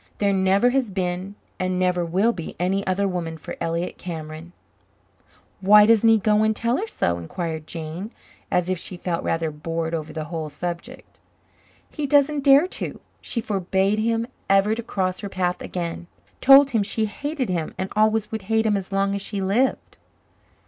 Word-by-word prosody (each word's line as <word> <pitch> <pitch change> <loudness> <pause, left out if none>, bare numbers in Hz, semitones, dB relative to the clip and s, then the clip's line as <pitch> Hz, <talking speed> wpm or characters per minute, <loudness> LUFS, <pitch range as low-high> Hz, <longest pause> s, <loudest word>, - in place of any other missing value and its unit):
"There 200 -1 +2
never 195 +5 +3
has 260 -3 +1
been 185 +1 -3 0.2
and 185 0 -1
never 180 -1 +1
will 190 +8 +1
be 170 -6 -7
any 190 +3 +1
other 195 +2 +1
woman 170 -3 -3
for - - -8
Elliott 170 +2 -2
Cameron." 160 -1 -7 1.1
"Why 210 +2 +7
doesn't 225 0 +5
he 225 - +6
go 210 0 +2
and 220 0 +2
tell 235 +3 0
her 430 - -3
so?" 85 - -1
inquired 160 - -5
Jane, 165 +5 -6 0.4
as 180 -1 +1
if 185 -2 -1
she 180 - -7
felt 175 -1 -3
rather 165 -1 -1
bored 165 +2 -4
over 160 -1 -3
the 155 - -4
whole 160 -1 -5
subject. 175 - -7 0.7
"He 300 -2 -3
doesn't 285 0 +3
dare 280 +3 +7 0.2
to. - - -4 0.2
She 230 - -3
forbade 195 0 0
him 230 +1 0 0.2
ever 195 +2 +4
to 230 - -3
cross 185 -5 -2
her 200 - -5
path 180 -2 -1
again. 170 -1 -5 0.3
Told 275 +1 +8
him 225 -3 +2
she 215 +2 0
hated 280 +4 -3
him 170 -3 -2
and 190 - -3
always 215 0 +2
would 220 -1 -3
hate 220 0 +2
him 210 -1 +2
as 195 0 -6
long 195 0 +1
as 200 - -2
she 200 0 -4
lived." 200 +8 0
195 Hz, 180 wpm, -23 LUFS, 175-220 Hz, 1.1 s, Told